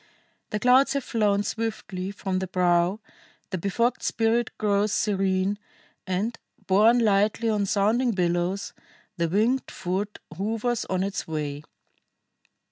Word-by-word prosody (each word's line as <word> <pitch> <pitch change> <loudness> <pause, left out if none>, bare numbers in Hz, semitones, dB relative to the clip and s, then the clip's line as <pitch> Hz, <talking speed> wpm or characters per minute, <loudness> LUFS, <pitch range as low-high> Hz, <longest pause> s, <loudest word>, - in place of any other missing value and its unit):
The 210 - -2
clouds 255 +5 +5
have 280 -2 -1
flown 205 -4 +1
swiftly 205 -4 -4
from 195 -2 -3
the 190 - -3
brow, 180 +1 +2 0.5
the 185 - -2
befogged 230 +7 0
spirit 230 +1 +1
grows 205 0 +1
serene, 195 -1 0 0.5
and, 205 +6 -2 0.3
borne 215 +6 +5
lightly 215 0 +2
on 205 -2 +1
sounding 220 +6 +2
billows, 180 -1 -1 0.4
the 170 -1 0
winged 225 +8 +1
foot 195 +3 -3 0.2
hovers 225 +5 -1
on 185 0 -1
its 195 0 -3
way. 150 -2 -3
200 Hz, 125 wpm, -25 LUFS, 185-225 Hz, 0.5 s, clouds